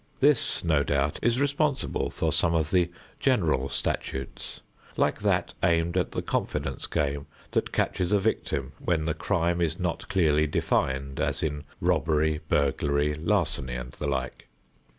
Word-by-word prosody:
This, 140 -2 +3
no 80 -4 +3
doubt, 70 0 0
is 120 +2 +2
responsible 145 0 0
for - - -1
some 85 0 +3
of 80 -1 0
the 90 -2 +3 0.3
general 65 +1 +2
statutes 65 +1 -3 0.4
like - - +2
that - - +1
aimed 85 0 +2
at 90 - +1
the - - -3
confidence - - -2
game 70 -1 -1 0.2
that - - 0
catches 90 0 0
a 105 - +5
victim 70 -9 -1
when 80 -3 0
the 80 - 0
crime 85 0 0
is 85 +2 0
not 90 -2 -2
clearly 80 -5 +3
defined 70 -1 0
as 70 0 -1
in 75 -1 -2
"robbery," 80 -1 +2
"burglary," 70 +1 +1
"larceny" 80 - 0
and 60 0 -5
the 75 - -5
like. 65 -2 -3
80 Hz, 150 wpm, -27 LUFS, 70-90 Hz, 0.4 s, a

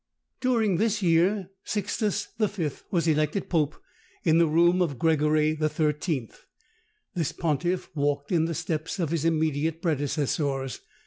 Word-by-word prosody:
During 225 -7 +2
this 210 0 +1
year 180 +3 +2
Sixtus 210 0 -1
V. 195 -8 0 0.2
was 170 -2 0
elected 155 +4 +1
pope 155 -4 +1 0.5
in 165 -1 +4
the 170 - +5
room 170 +3 +4
of 150 -7 0
Gregory 155 0 +2
XIII. 150 -3 -1 0.8
This 170 -6 -1
pontiff 175 +3 -1
walked 145 -1 -1
in 165 -3 +3
the 165 0 -2
steps 160 +1 -3
of 165 -5 -1
his 165 -2 -1
immediate 160 -1 +1
predecessors. 145 - -1
160 Hz, 130 wpm, -26 LUFS, 150-180 Hz, 0.8 s, the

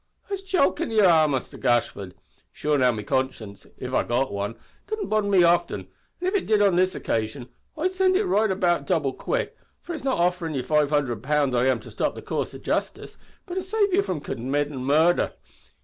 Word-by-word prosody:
"It's 395 -1 -2
jokin' 360 - +1
ye 220 -1 +3
are, 165 -5 +5
Muster 135 -3 -3
Gashford. 100 -6 0 0.4
Sure, 150 0 -1
now, 130 -3 +4
me 110 -3 -5
conscience 115 -5 -3
if - - -6
I've - - +1
got 125 0 0
wan 100 +3 -3 0.3
doesn't 435 -1 -3
bother 215 -1 +1
me 190 -3 +5
oftin; 170 0 +2
an' 360 - -10
if 375 - 0
it 400 - 0
did, 215 -1 +3
on 200 -3 +4
this 185 +1 +2
occasion, 115 +3 -3 0.3
I'd 360 +4 0
send 375 0 +2
it 385 - +3
to - - 0
the - - -3
right 215 +1 +3
about 180 -3 +1
double 155 -8 +1
quick, - - -2 0.3
for 350 - -6
it's 310 - -6
not 270 -1 0
offerin' 175 -2 0
ye 130 - -1
five 150 +1 +2
hundred 135 -8 0
pound 140 -1 +1
I 120 +2 +2
am 130 -3 +2
to - - -12
stop - - -1
the - - -9
coorse - - -3
o' - - -6
justice, - - -3 0.3
but 355 - -7
to 375 - -1
save 400 +1 0
ye 390 - +4
from 180 - -3
committin' 140 +2 -2
murther! 160 +6 +3
165 Hz, 215 wpm, -24 LUFS, -, 0.4 s, are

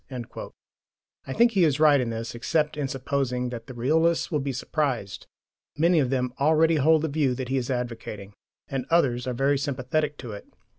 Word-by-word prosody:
"* - - -40
I 130 - -3
think 235 - +4
he 195 -5 +3
is 150 -3 +2
right 150 -3 +5
in 120 - -2
this, 115 0 -4
except 150 +6 0
in 145 -2 -2
supposing 130 -2 -2
that 115 -2 -7
the 130 - -9
realists 160 +9 +1
will 150 - +1
be 135 0 -2
surprised. 130 - -3 0.5
Many 170 +2 +4
of 135 -4 +1
them 125 -2 -1
already 160 +2 +4
hold 155 +2 +4
the - - +1
view 140 -4 0
he 130 +1 -2
is 125 -1 -2
advocating, 115 -5 -5 0.3
and 130 -2 -4
others 130 -7 +2
are 125 - -1
very 135 +2 +2
sympathetic 145 +2 -1
to 120 - -8
it. 100 - -9
135 Hz, 190 wpm, -25 LUFS, 125-155 Hz, 0.5 s, right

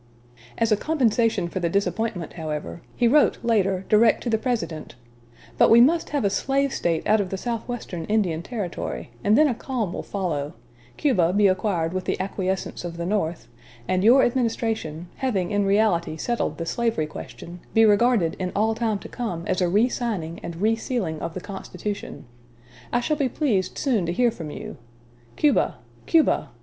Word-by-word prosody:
As 230 -1 +1
a 215 - +4
compensation 230 - +1
for 185 - -4
the 170 -2 0
disappointment, 200 -2 -1
however, 150 - -5
he 240 - +3
wrote 290 +5 +4
later 195 -5 +1
direct 220 +1 +4
to 240 - -2
the 220 - +2
President: 220 -11 -3 0.6
"But - - +6
we 230 - +8
must 320 +8 +4
have 285 -7 -1
a - - +4
slave 275 +4 0
State 165 -2 -1
out 215 0 +4
of 190 - -4
the 190 - -3
southwestern 230 -6 -4
Indian 190 -6 0
Territory, 185 - -5
and 210 +3 +4
then 305 - +6
a 260 - +1
calm 235 -5 -3
will - - -4
follow; 165 -6 -3 0.4
Cuba 185 - +2
be 205 +1 +4
acquired 185 -3 +1
with 185 -1 -3
the - - -1
acquiescence 190 -1 -3
of 170 -1 -6
the 170 - -3
North; 175 -4 -1 0.4
and 185 0 +1
your 250 +5 +7
administration, 225 -9 -1
having 200 -10 -1
in 205 -1 +1
reality 195 -6 +2
settled 240 +8 -2
the 165 - -4
slavery 230 -4 0
question, 170 +3 -9 0.2
be 225 0 +7
regarded 210 -4 +3
in 185 -1 -2
all 220 +2 +2
time 220 -2 -1
to - - -10
come 180 -9 -4
as 185 0 0
a 180 - +2
re 210 +7 +4
signing 200 -10 -3
and 170 - -6
re 225 +1 +4
sealing 215 -9 -3
of 165 - -5
the 185 - -4
Constitution.... 200 +1 -6 0.7
I 240 - +1
shall 305 +4 0
be 275 -3 +1
pleased 225 - 0
soon 225 - +1
to - - 0
hear 240 +6 +2
from 165 -7 -7
you. - - -8 0.6
Cuba! 300 -2 +2 0.3
Cuba! 325 -2 +3
205 Hz, 180 wpm, -24 LUFS, 175-235 Hz, 0.7 s, we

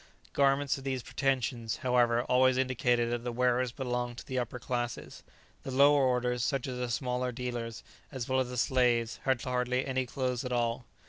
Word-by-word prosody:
Garments 140 0 +2
of - - -11
these 130 -2 -2
pretensions, 130 -4 -1
however, 120 -1 +3
always 130 +1 +3
indicated 125 -2 +1
that 120 -1 -2
the 120 - -2
wearers 125 0 +1
belonged 125 -2 -3
to - - -8
the 130 -1 -2
upper 125 0 -4
classes; 120 0 -4 0.4
the - - -7
lower 140 +2 +5
orders, 125 -1 +1
such 135 -2 0
as 125 -2 -4
the 125 -1 -2
smaller 125 +1 -1
dealers, 120 -2 -5 0.3
as 130 -4 -5
well 130 0 +1
as 130 -1 0
the 125 - -5
slaves, 120 -2 +2
had 130 -2 +2
hardly 125 0 0
any 130 -1 -1
clothes 125 -1 -2
at 125 - -4
all. 120 0 0
125 Hz, 185 wpm, -30 LUFS, 120-130 Hz, 0.4 s, lower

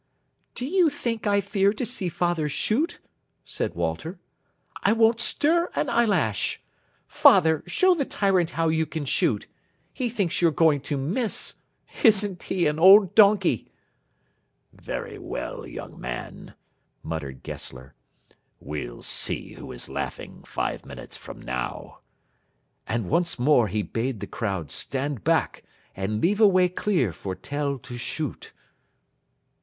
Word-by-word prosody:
"Do 250 - -4
you 350 +2 +3
think 235 -7 -3
I 200 0 +3
fear 200 0 +2
to 230 +3 -3
see 200 -6 -2
father 175 -2 0
shoot?" 270 - 0 0.5
said - - -3
Walter. 85 - -3 0.6
"I 205 - +4
won't 225 0 +4
stir 335 +7 +1
an 275 - 0
eyelash. 190 - +1 0.5
Father, 160 -1 +5
show 370 0 +4
the 320 -5 0
tyrant 190 -8 +1
how 165 0 +2
you 160 0 +1
can 155 -1 -4
shoot. - - +1 0.5
He 250 -3 -2
thinks 200 -8 -1
you're 170 - +5
going 155 -3 +3
to 145 - 0
miss. 195 - -2 0.5
Isn't 205 - +3
he 180 -2 0
an 150 +1 +1
old 190 +2 +8
donkey!" 200 - +4 1.0
"Very - - -6
well, - - -5
young - - -9
man," - - -7 0.5
muttered 70 -5 -5
Gessler, 65 +1 -8 0.7
"we'll 65 -5 -6
see - - -2
who - - -9
is - - -7
laughing - - -6
five - - -3
minutes - - -9
from - - -10
now." 65 0 -5 0.9
And 115 -4 -1
once 170 +2 +1
more 125 -3 +4
he 105 0 -1
bade 115 +1 -3
the - - -4
crowd 95 -9 -3
stand 135 -5 -3
back - - +1 0.3
and 100 +3 -2
leave 205 +5 +2
a 215 - +9
way 185 -2 +4
clear 175 - 0
for 95 +3 -5
Tell 145 +2 -3
to 120 0 -9
shoot. 150 +3 -5
165 Hz, 140 wpm, -25 LUFS, -, 1.0 s, a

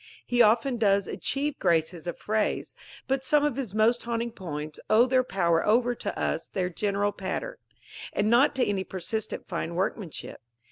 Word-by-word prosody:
He 245 0 +2
often 235 +3 +4
does 200 -3 +2
achieve 285 +1 -2
graces 165 0 +1
of 175 - -3
phrase; 215 0 -1 0.3
but 270 0 0
some 295 +2 +3
of 295 -5 0
his 245 -7 -4
most 225 +3 +3
haunting 235 0 -2
poems 155 -7 -6
owe 225 +3 +6
their 255 0 +3
power 170 -7 +1
over 240 +3 +3 0.2
us - - -1
to - - -35
their 180 -2 0
general 205 +2 0
pattern, 205 - -4 0.5
and 205 - 0
not 245 +6 +4
to 260 - +2
any 195 -2 -1
persistent 200 +4 -4
fine 170 +1 -3
workmanship. 185 -1 -4
215 Hz, 170 wpm, -27 LUFS, 190-245 Hz, 0.5 s, owe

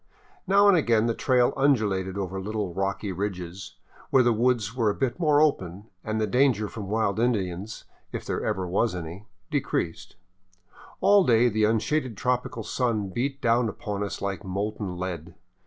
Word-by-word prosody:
Now 200 +1 +5
and 200 - +7
again 115 -9 +3
the 115 - +1
trail 125 0 +2
undulated 105 -9 +1
over 95 -1 -3
little 105 -2 -3
rocky 95 +2 -2
ridges, 90 -1 -5 0.3
where 130 - +5
the 120 -1 +3
woods 115 -2 +1
were 115 -4 +2
a 100 - -1
bit 130 +3 -2
more 150 -4 +4
open 100 - 0
and 110 0 -2
the 110 - +2
danger 125 -1 +2
from 105 -2 -7
wild 110 -1 0
Indians 105 -4 -1 0.2
— - - -41
if - - -5
there - - -2
ever 95 -1 -1
was 95 +3 +1
any 85 +4 -7
— 90 0 -41
decreased. 90 +2 -2 0.9
All 200 -1 +6
day 120 -4 +4
the 110 -1 +2
unshaded 115 +2 0
tropical 125 -2 -1
sun 110 -4 -1
beat 135 +7 -3
down 115 0 +2
upon 105 0 -5
us 100 - -5
like 100 0 -3
molten 100 0 -3
lead. 90 -1 -5
110 Hz, 170 wpm, -26 LUFS, 95-125 Hz, 0.9 s, and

